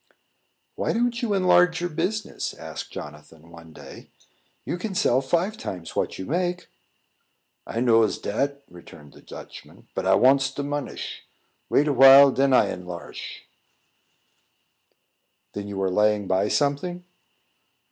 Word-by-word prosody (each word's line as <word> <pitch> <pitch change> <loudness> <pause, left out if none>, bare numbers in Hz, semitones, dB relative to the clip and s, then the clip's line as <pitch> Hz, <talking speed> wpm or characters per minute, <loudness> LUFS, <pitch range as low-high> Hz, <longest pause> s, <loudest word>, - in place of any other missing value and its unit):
"Why - - -2
don't 235 0 -1
you 220 -4 0
enlarge 180 -3 +3
your 175 +1 -2
business?" 215 +7 -3
asked - - -8
Jonathan, 75 +2 -11
one 85 -1 -14
day. - - -13 0.6
"You 175 - -4
can 200 -1 -5
sell 130 -6 +2
five 175 +10 -1
times 90 -3 -7
what - - -2
you 95 - -6
make." 180 - -2 1.0
"I 115 - -3
knows 115 -3 +3
dat," 140 +7 -3
returned 75 -4 -15
the - - -16
Dutchman, - - -13
"but - - -3
I - - +5
wants 135 +1 +4
de 140 - -5
monish. 145 0 -5 0.5
Wait 150 - +2
a 145 - +1
while, 135 +2 +8
den 135 +1 +1
I 130 - +4
enlarsh." 90 -1 -8 2.1
"Then 100 0 -6
you 100 -1 -5
are 95 - 0
laying 105 +1 +2
by 95 +2 +1
something?" 150 +8 -1
135 Hz, 135 wpm, -24 LUFS, -, 2.1 s, while